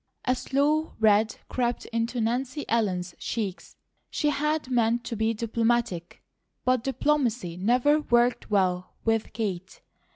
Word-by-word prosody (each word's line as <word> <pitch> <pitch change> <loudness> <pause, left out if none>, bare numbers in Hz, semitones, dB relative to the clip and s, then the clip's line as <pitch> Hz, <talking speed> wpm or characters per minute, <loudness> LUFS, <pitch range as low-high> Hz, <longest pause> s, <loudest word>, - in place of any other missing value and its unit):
A 255 - +3
slow 290 +5 0
red 215 0 +4
crept 240 -1 -1
into 230 +2 -1
Nancy 255 +5 -1
Ellen's 185 -6 0
cheeks. 205 -5 -4 0.3
She 300 - 0
had 300 -2 -1
meant 235 -1 +2
to 230 - -4
be 220 +1 0
diplomatic, 230 -5 -1 0.4
but 255 -2 +2
diplomacy 250 - 0
never 245 +10 +3
worked 240 -2 +2
well 185 -3 0
with 225 -1 +1
Kate. 190 -4 -4
230 Hz, 125 wpm, -27 LUFS, 210-255 Hz, 0.4 s, red